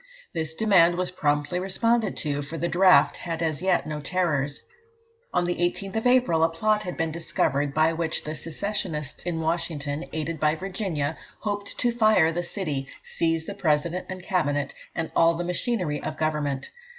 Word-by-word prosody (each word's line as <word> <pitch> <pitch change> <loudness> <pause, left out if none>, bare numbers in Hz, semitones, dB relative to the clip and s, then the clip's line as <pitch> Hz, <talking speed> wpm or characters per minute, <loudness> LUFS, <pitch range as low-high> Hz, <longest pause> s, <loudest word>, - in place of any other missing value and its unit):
This 160 -2 -3
demand 180 -5 +5
was 180 0 0
promptly 150 +1 0
responded 215 +3 +1
to, 145 -2 -1
for 145 +3 -6
the 170 - 0
draft 185 +1 +5
had 165 -1 -3
as 155 -1 -1
yet 185 -1 +2
no 150 -1 -4
terrors. 145 -3 0 0.7
On - - +2
the 175 0 -1
18th 185 +3 -1
of 225 - +1
April, 245 -11 +4
a 165 - +4
plot 210 +6 +1
had 180 -4 -5
been 165 -2 0
discovered 145 -3 0
by 155 +1 +4
which 165 -1 -1
the 155 - -4
secessionists 165 -2 -3
in 165 -2 -1
Washington, 160 -2 -2
aided 160 0 -3
by 155 +1 +3
Virginia, 170 -5 -3 0.2
hoped 205 -1 -4
to 245 - +2
fire 215 -8 +4
the 175 +2 -1
city, 155 -7 -3 0.2
seize 165 -1 0
the 200 - -5
President 170 -1 0
and 185 -1 -6
Cabinet, 145 -8 0 0.2
and 165 - -3
all 165 0 +5
the 175 - -2
machinery 180 -3 -1
of 155 - -4
government. 150 -3 -1
165 Hz, 175 wpm, -26 LUFS, 155-185 Hz, 0.7 s, demand